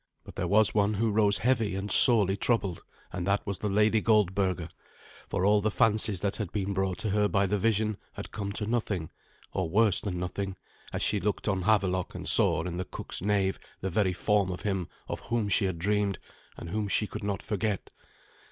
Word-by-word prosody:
But - - -12
there - - -2
was 105 +1 +3
one 105 0 +1
who 110 +2 0
rose 105 -1 +3
heavy 115 -5 0
and 100 +2 -4
sorely 105 -6 +8
troubled, 100 -6 -1 0.3
and 90 0 -4
that 100 +1 0
was 100 -2 -4
the 105 - -2
Lady 105 +2 +2
Goldberga, 95 -5 +1 0.6
for 90 - -1
all 105 0 +4
the 110 - 0
fancies 110 -3 +1
that 100 -1 -2
had 105 -6 -4
been 100 -1 -2
brought 95 -1 -1
to 110 - -2
her 105 0 +2
by 100 -1 +1
the 100 +2 -1
vision 110 -1 0 0.2
had - - -9
come 100 -2 -5
to 105 - -3
nothing, 105 -7 -2 0.4
or 95 -3 -2
worse 105 +1 +3
than 95 -4 -4
nothing, 95 +2 -4 0.4
as - - -3
she 105 - +2
looked 105 +4 -3
on 95 -2 0
Havelok 95 -4 +1
and - - -6
saw - - +5
in 90 -1 -5
the 90 - -3
cook's - - -5
knave 100 -1 0 0.2
the 95 - -3
very 95 0 +1
form 105 0 +1
of 90 - -6
him 95 -4 -2 0.2
of - - -5
whom 115 -3 -2
she 100 - +2
had 95 -3 -2
dreamed, 100 +2 0 0.4
and 85 - -8
whom 105 0 -2
she 105 - +1
could 105 - -8
not 100 0 -3
forget. 105 -1 -3
100 Hz, 205 wpm, -28 LUFS, 95-105 Hz, 0.6 s, sorely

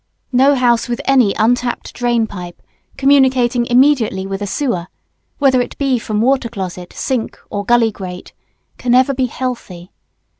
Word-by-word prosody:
No 270 +3 +4
house 240 -2 +2
with 240 - -2
any 255 -7 +3
untrapped 245 +2 0
drain 240 -2 0
pipe 180 -4 -9 0.4
communicating 260 -3 +3
immediately 245 -7 +2
with 195 +1 -5
a 205 - -3
sewer, 195 - -2 0.5
whether 265 -3 +3
it 245 - -6
be 270 -3 +1
from 215 -1 -2
water 260 0 +1
closet, 185 -4 -6
sink, 250 -4 -3
or 205 - -3
gully 235 0 +3
grate, 180 -3 -9 0.5
can 245 0 +1
ever 260 +2 +4
be 260 -1 0
healthy. 225 -8 -6
240 Hz, 150 wpm, -17 LUFS, 205-260 Hz, 0.5 s, No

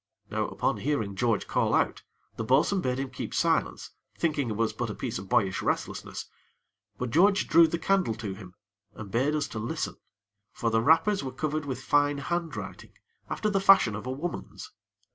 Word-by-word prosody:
Now, - - 0
upon - - -1
hearing 115 -9 -1
George 115 +1 +1
call - - +1
out, - - +1 0.3
the - - -3
bo'sun 140 - +3
bade 125 -3 -1
him 135 -1 -3
keep 125 - -5
silence, - - 0 0.3
thinking 150 -6 0
it 110 - -2
was 115 +1 0
but 120 -2 -3
a 105 - -5
piece 120 -7 -4
of 95 - -10
boyish 100 -6 +2
restlessness; - - -3 0.7
but 125 -2 -3
George 195 - +4
drew 165 +1 +7
the 170 - -2
candle 180 - +1
to 105 -3 -5
him, 95 -2 -12 0.4
and 105 -3 -9
bade 135 +7 +1
us 150 - 0
to 115 -1 -5
listen; 115 +2 -3 0.6
for 115 - -1
the 115 0 +3
wrappers 165 - +3
were 130 - -4
covered 155 +3 -2
with 130 -3 -5
fine 145 0 +2
handwriting 170 +3 -4 0.4
after 215 -1 -1
the 195 -1 +1
fashion 195 - +6
of 110 +4 -6
a - - -2
woman's. 155 +7 -6
130 Hz, 185 wpm, -28 LUFS, 115-160 Hz, 0.7 s, drew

